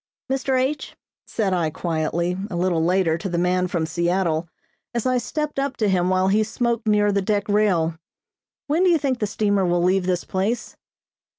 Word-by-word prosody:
"Mr. 265 -1 +1
H 275 +4 -2 0.2
," - - -74
said 200 -4 -1
I 170 -3 +1
quietly, 170 +2 -1
a 180 - -5
little 170 -2 +1
later, 170 -2 +2
to 195 - -4
the 170 - -2
man 180 +1 +1
from 170 -3 -1
Seattle, 170 0 0 0.5
as 235 - -1
I 255 -1 +2
stepped 300 +4 -3
up 275 0 -2
to 215 - +1
him 185 -2 +2
while 185 0 +2
he 215 +2 +3
smoked 235 +1 -2
near 210 -1 +3
the 200 0 +1
deck 205 +1 0
rail. 180 -6 +1 0.7
"When 315 +5 +1
do 370 - +5
you 340 - +5
think 265 -4 -1
the 210 - 0
steamer 205 -1 +1
will 175 -1 +1
leave 185 0 +2
this 180 -1 0
place?" 200 +6 -2
190 Hz, 195 wpm, -22 LUFS, 175-230 Hz, 0.7 s, do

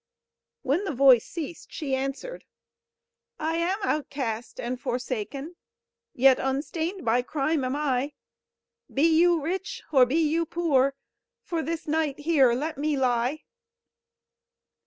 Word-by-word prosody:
When 290 +8 +1
the 375 -8 -3
voice 255 -3 +6
ceased, 330 0 -7
she 280 -4 -4
answered: 275 - -3 0.9
"I 320 +1 -1
am 350 +4 0
outcast 265 - -3
and 245 +1 -4
forsaken; 255 +7 -4 0.6
Yet 265 +1 +5
unstained 320 +7 -2
by 235 +2 +3
crime 290 +3 -1
am 255 +1 -1
I: 285 -1 -1 0.8
Be 275 - +1
you 335 +1 +5
rich, 380 +10 -4
or 260 -4 +6
be 260 - -1
you 325 +1 +1
poor; 275 -6 +2 0.5
For 340 -5 -2
this 325 0 -4
night 305 -2 0
here 290 -6 +4
let 290 +4 -3
me 300 0 0
lie!" 255 +3 0
290 Hz, 125 wpm, -26 LUFS, 260-330 Hz, 0.9 s, voice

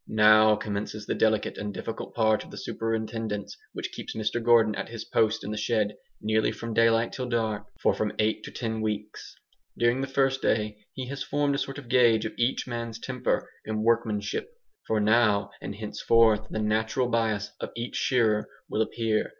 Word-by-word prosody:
Now 110 0 +6
commences 105 0 -4
the - - -1
delicate 110 -1 +1
and 105 0 -3
difficult 115 +2 -6
part 110 -2 +3
of - - -14
the - - -10
superintendence 110 -2 -3 0.2
which - - -5
keeps - - -7
Mr 110 +2 -1
Gordon 115 -2 +5
at - - -4
his 115 -1 -6
post 110 0 +1
in 105 - -4
the 105 - -3
shed, 105 -1 0 0.2
nearly 110 0 +1
from 115 -1 -5
daylight 115 0 +3
till 130 -1 -4
dark, 110 -3 -1
for - - +3
from - - -1
eight 110 0 +1
to - - -8
ten 110 -2 -3
weeks. 105 -1 -4 0.4
During 120 +2 +2
the 135 - -2
first 135 0 +1
day 105 -1 -1
he 130 -1 -5
has 140 0 -5
formed 145 -1 0
a 140 - 0
sort 135 -1 -4
of 140 -4 -9
gauge 120 -3 +4
of 110 - -4
each 120 +2 0
man's 115 -2 -4
temper 125 +1 -1 0.2
and 110 0 -2
workmanship. 110 - 0 0.4
For 110 - +1
now, 105 -2 +3
and 100 - -5
henceforth, 110 0 +3
the - - -4
natural 110 +4 +1
bias 110 -4 0
of - - -4
each 120 +1 -4
shearer 110 -5 +2 0.2
will 110 - 0
appear. 110 -1 0
110 Hz, 185 wpm, -27 LUFS, 105-120 Hz, 0.4 s, Now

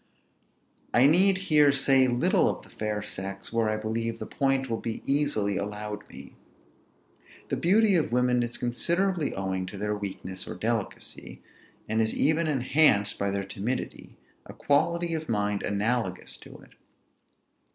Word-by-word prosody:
I 120 - +6
need 185 +6 +5
here 150 -6 +4
say 135 -1 +4
little 120 0 +2
of - - -4
the - - -18
fair 105 -1 -3
sex, 95 +1 -5
where 115 -1 +1
I 110 - 0
believe 115 +1 -3
the - - -6
point 135 -1 0
will 115 -2 -2
be 115 -1 -4
easily 135 -9 0
allowed 105 +1 -5
me. - - -12 1.2
The - - 0
beauty 205 +4 +3
of 165 -8 +1
women 125 0 +2
is 120 0 -1
considerably 170 +7 -1
owing 95 -1 -3
to 100 - -7
their 105 +1 -1
weakness 95 -2 -6
or - - -6
delicacy, 115 -2 -4 0.4
and 110 +1 +1
is 110 - 0
even 160 +3 +2
enhanced 130 -7 +3
by 100 - 0
their 100 0 -2
timidity, 105 +6 -5 0.3
a - - -10
quality 170 +4 +1
of 160 -3 -4
mind 105 -2 0
analogous 105 -2 -1
to - - -13
it. - - -19
115 Hz, 150 wpm, -27 LUFS, 105-145 Hz, 1.2 s, I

